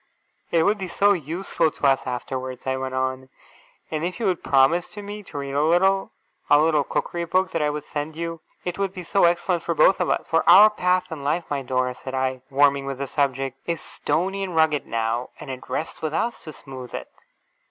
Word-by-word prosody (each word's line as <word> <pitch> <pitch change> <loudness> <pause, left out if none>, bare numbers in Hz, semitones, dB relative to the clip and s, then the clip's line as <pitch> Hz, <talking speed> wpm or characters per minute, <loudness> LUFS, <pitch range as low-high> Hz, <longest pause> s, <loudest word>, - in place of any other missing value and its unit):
' - - -43
It - - +4
would 205 +4 +2
be 190 - -3
so 200 +4 +3
useful 165 0 -1
to 150 - -5
us 135 -1 +3
afterwards,' 130 0 -4
I 130 0 0
went 130 0 -4
on. 130 0 -2 0.6
'And 155 0 -2
if 180 +4 -3
you 230 - -1
would 185 -3 +1
promise 140 +9 +2
me 205 +1 -6
to 175 -7 -10
read 140 -1 -4
a 145 - +2
little 190 +4 +3 0.4
a 145 - +7
little 155 -1 +3
Cookery 170 +4 -2
Book 185 +3 +1
that 165 - -1
I 150 - +2
would 150 0 -4
send 150 +1 -5
you, 165 0 -5 0.2
it 180 +1 -3
would 195 -1 -1
be 180 - -6
so 195 +2 +3
excellent 175 0 +1
for - - -2
both - - +5
of - - 0
us. - - 0
For - - +2
our 215 +1 +9
path 180 -3 0
in 150 -3 -6
life, 155 +5 0
my 140 -1 0
Dora,' 130 -1 -1
said 130 +1 -7
I, 130 -1 -1
warming 140 0 +3
with 135 -1 -3
the 140 - -3
subject, 135 -1 -1
'is 170 -2 -1
stony 195 +4 -2
and 185 -3 -4
rugged 160 -3 +2
now, 115 +2 -1
and 135 - -7
it 130 -1 -9
rests 160 - -4
with 155 0 -2
us 235 +1 -2
to 155 - -6
smooth 130 -3 -9
it. - - -6
155 Hz, 225 wpm, -24 LUFS, 135-180 Hz, 0.6 s, our